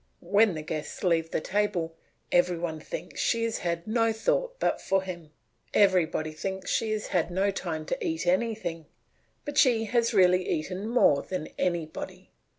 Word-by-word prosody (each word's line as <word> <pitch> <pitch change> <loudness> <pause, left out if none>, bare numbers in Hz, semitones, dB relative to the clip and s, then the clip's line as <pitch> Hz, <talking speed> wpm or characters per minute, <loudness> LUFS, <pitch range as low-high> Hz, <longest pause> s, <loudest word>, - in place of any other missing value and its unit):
When 200 +1 +4
the 155 - -5
guests 155 -1 -5
leave 165 -3 +2
the - - -1
table 180 -5 -1 0.4
every 175 0 +3
one 165 -2 -3
thinks 165 +2 -7
she 230 -1 +1
has 230 0 -1
had 170 -1 -2
no 225 +1 +2
thought - - -1
but - - 0
for 195 0 +1
him, 175 -4 -7 0.5
everybody 175 -6 +3
thinks 190 +5 -4
she 225 - +1
has 215 - -3
had 175 -3 +1
no 190 +3 +1
time 160 -5 -4
to - - -3
eat 160 +1 -2
anything, 180 -4 -1 0.6
but 290 -1 0
she 240 -5 +4
has 235 +1 +1
really 180 -3 +4
eaten 185 +6 -2
more 150 - +4
than 185 -2 -5
anybody. 170 -3 -3
185 Hz, 165 wpm, -28 LUFS, 165-220 Hz, 0.6 s, When